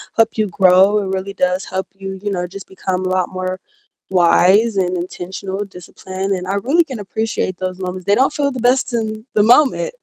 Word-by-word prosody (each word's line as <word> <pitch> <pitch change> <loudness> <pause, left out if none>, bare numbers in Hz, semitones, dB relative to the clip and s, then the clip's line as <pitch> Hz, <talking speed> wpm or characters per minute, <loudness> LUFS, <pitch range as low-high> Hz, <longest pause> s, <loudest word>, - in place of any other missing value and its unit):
help 225 0 +2
you 215 -1 +1
grow, 190 +3 +4
it 190 -1 -3
really 195 +1 -4
does 180 0 0
help 190 0 -4
you, 195 -1 -7
you 205 - -1
know, 180 -2 -2
just 195 +1 -10
become 185 -1 -3
a - - 0
lot 185 -1 0
more 185 0 -4 0.5
wise 190 +4 +4
and 180 -1 +1
intentional, 190 +3 -5
disciplined, 190 +1 -6
and 185 -1 -4
I 195 - -1
really 275 +12 +2
can 260 -8 -7
appreciate 205 -3 -3
those 185 0 -4
moments. 185 -1 -5
They 200 - +3
don't 270 +4 +2
feel 280 -1 0
the 255 - -5
best 250 +1 +2
in 220 -1 -3
the 210 - +5
moment, 300 - +4
195 Hz, 205 wpm, -18 LUFS, 185-220 Hz, 0.5 s, the